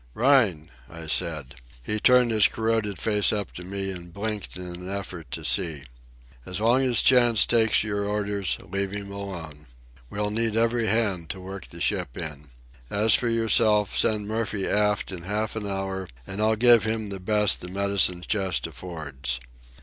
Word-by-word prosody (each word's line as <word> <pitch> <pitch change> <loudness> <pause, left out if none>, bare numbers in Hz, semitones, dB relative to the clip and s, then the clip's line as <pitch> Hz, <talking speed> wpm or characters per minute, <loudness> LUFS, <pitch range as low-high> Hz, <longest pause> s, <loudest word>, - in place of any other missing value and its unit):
"Rhine!" 115 - +3 0.2
I 85 -1 -9
said. 75 -3 -1 0.3
He 105 - -2
turned 125 0 +5
his 110 -2 +5
corroded 110 -3 -1
face 105 -2 +2
up 105 -2 -3
to 90 - -9
me 95 +1 -4
and 85 -2 -9
blinked 105 0 -5
in 90 - -7
an 90 +1 -7
effort 95 -6 -6
to - - -5
see. 80 -5 0 0.6
"As 90 +6 -4
long 120 +4 +3
as 125 -3 +3
Chantz 120 -4 +5
takes 115 -2 +3
your 100 -1 -2
orders, 100 -2 -2
leave 100 +3 -2
him 100 0 -6
alone. 85 -8 -8 0.4
We'll 105 0 -2
need 110 0 -1
every 115 0 +1
hand 100 -7 +1
to 95 - -5
work 95 0 -8
the - - -11
ship 60 - -1
in. 75 -3 -7 0.4
As 105 +2 +3
for 120 - +3
yourself, 110 -2 +3
send 105 -2 +1
Murphy 110 -2 -2
aft 105 -1 0
in 90 -2 -6
half 105 +5 -2
an 105 -2 -4
hour 95 -1 -3 0.2
and 95 +7 -5
I'll 110 +1 +3
give 120 0 +5
him 110 -1 -2
the 100 -1 -5
best 105 +2 +2
the - - -7
medicine 95 -2 +2
chest 95 - 0
affords. 70 -8 -5
100 Hz, 175 wpm, -25 LUFS, 90-110 Hz, 0.6 s, turned